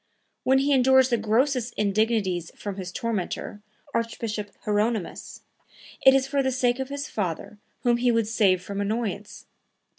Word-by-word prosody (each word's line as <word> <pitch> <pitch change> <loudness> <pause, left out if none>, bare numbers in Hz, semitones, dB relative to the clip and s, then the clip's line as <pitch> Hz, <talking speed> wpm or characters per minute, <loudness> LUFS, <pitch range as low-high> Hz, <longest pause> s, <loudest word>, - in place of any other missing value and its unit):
When 265 +1 +4
he 280 +2 +2
endures 260 0 +5
the 240 - +2
grossest 240 +3 +1
indignities 205 -4 0
from 200 -2 -6
his 185 -2 -5
tormentor, 210 -1 -3 0.3
Archbishop 230 -2 -3
Hieronymus, 210 -1 -2 0.6
it 265 0 +8
is 270 -1 +3
for 275 0 0
the 265 -1 0
sake 245 0 +1
of 265 0 -3
his 280 0 -4
father 195 +1 -4 0.2
whom 240 -1 +3
he 245 0 +2
would 230 -2 +1
save 195 -5 +2
from 200 +1 -4
annoyance. 210 -1 -3
230 Hz, 150 wpm, -25 LUFS, 205-255 Hz, 0.6 s, it